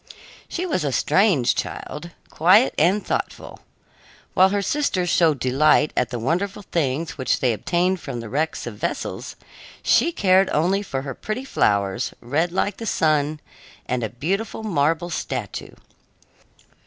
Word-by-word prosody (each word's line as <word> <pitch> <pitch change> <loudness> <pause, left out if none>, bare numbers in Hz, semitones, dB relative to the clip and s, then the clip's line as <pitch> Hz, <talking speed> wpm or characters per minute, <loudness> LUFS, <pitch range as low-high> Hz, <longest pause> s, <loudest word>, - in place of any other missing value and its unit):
She 360 - -3
was 295 - -1
a 145 - 0
strange 155 - +3
child, 170 +3 -5 0.2
quiet 185 +10 +5
and 200 +4 +2
thoughtful. - - -4 0.7
While 190 +1 +5
her 200 0 0
sisters 185 - 0
showed 160 -4 +3
delight 150 +3 +3
at 125 - +1
the 125 - -4
wonderful 185 - -2
things 160 -3 -2
which 130 - +1
they 125 -3 +2
obtained 180 - 0
from 135 -6 -6
the 115 - -7
wrecks 150 +6 -2
of 115 -4 -7
vessels, - - -4 0.5
she 340 - +3
cared 190 - +3
only 185 +6 +1
for 135 -9 -4
her 135 -1 -5
pretty 230 - -5
flowers, 100 - 0
red 155 +8 -1
like 190 +2 -1
the 225 - -6
sun, 155 -3 +1 0.4
and 125 -1 -2
a 110 - -2
beautiful 190 - -3
marble 165 -2 0
statue. 125 -9 -4
160 Hz, 145 wpm, -22 LUFS, 130-195 Hz, 0.7 s, quiet